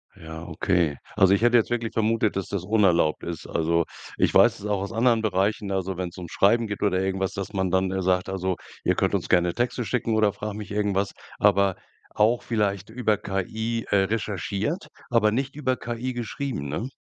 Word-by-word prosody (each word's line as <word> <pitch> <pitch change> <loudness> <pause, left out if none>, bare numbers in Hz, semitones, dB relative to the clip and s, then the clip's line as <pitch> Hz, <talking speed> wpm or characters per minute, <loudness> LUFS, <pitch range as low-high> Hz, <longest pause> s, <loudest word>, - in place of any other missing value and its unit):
Ja, 80 +1 -9
okay. 85 -3 0 0.2
Also, 95 0 +5
ich 100 - +2
hätte 120 0 +6
jetzt 115 - +2
wirklich 115 -2 -2
vermutet, 110 -1 +1
dass 95 - -2
das 100 -3 -3
unerlaubt 90 -6 +2
ist. 85 -2 -5
Also, 85 +1 +1 0.3
ich - - +2
weiß - - +5
es - - -9
auch 105 -2 0
aus 100 - -4
anderen 115 0 +3
Bereichen, 100 0 0
also, 95 -1 -1
wenn's 90 -1 -5
ums 85 -3 -8
Schreiben 115 +4 +3
geht 100 -1 -5
oder 95 -3 +2
irgendwas, 95 0 -1
dass 100 +1 -5
man 95 -2 0
dann, 95 +1 +1
äh, 95 0 -1
sagt: 90 0 +1
„Also 95 -1 -1 0.3
ihr - - +2
könnt - - +1
uns - - -3
gerne 90 -1 +3
Texte 120 0 -1
schicken 115 -2 0
oder 110 -2 +3
frag 105 0 -5
mich 105 -2 -7
irgendwas, 100 -1 0 0.2
aber 100 -2 +3 0.4
auch 115 +3 +3
vielleicht 105 -4 -1
über 110 -2 +1
KI, 110 +5 -3
äh, 100 - +3
recherchiert, 105 - -2 0.2
aber 115 -3 +3
nicht 135 +5 -2
über 130 -3 0
KI 120 +1 -4
geschrieben“, 120 - -4
ne? 80 - -3
100 Hz, 195 wpm, -25 LUFS, 95-115 Hz, 0.4 s, hätte